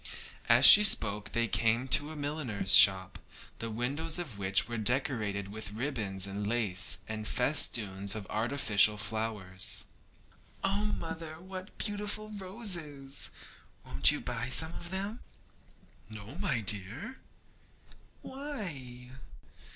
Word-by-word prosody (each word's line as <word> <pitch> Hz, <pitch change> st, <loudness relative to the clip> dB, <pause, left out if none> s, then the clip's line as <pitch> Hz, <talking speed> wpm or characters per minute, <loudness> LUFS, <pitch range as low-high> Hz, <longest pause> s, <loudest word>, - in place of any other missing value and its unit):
As -, -, +6 dB
she 210 Hz, -, +11 dB
spoke 105 Hz, -, +2 dB
they 115 Hz, 0 st, 0 dB
came 115 Hz, +5 st, -1 dB
to 145 Hz, +3 st, +4 dB
a 155 Hz, -, -8 dB
milliner's 145 Hz, -10 st, -1 dB
shop, 95 Hz, -1 st, +7 dB, 0.4 s
the 115 Hz, -, -6 dB
windows 140 Hz, +9 st, -3 dB
of 165 Hz, -11 st, -6 dB
which 95 Hz, 0 st, +1 dB
were 120 Hz, -1 st, -5 dB
decorated 105 Hz, -4 st, -2 dB
with 105 Hz, 0 st, -8 dB
ribands 105 Hz, -6 st, -2 dB
and 100 Hz, +1 st, -5 dB
lace 105 Hz, -5 st, +1 dB
and 110 Hz, -1 st, -6 dB
festoons 105 Hz, -7 st, +1 dB
of 105 Hz, -3 st, -7 dB
artificial 110 Hz, -3 st, +1 dB
flowers. 105 Hz, -4 st, -3 dB, 0.8 s
'Oh 205 Hz, +2 st, -1 dB
mother, 165 Hz, -5 st, -6 dB
what 185 Hz, +2 st, -10 dB
beautiful 210 Hz, 0 st, -5 dB
roses! 180 Hz, -9 st, -1 dB, 0.6 s
Won't 70 Hz, +2 st, +3 dB
you -, -, -4 dB
buy 120 Hz, +2 st, -5 dB
some 160 Hz, +5 st, 0 dB
of 175 Hz, -, -9 dB
them?' 200 Hz, +5 st, -4 dB, 0.9 s
'No, 110 Hz, +4 st, -11 dB
my 170 Hz, -, -1 dB
dear.' 105 Hz, -, -4 dB, 1.0 s
'Why?' 155 Hz, -, -8 dB
120 Hz, 120 wpm, -29 LUFS, 105-165 Hz, 1.0 s, she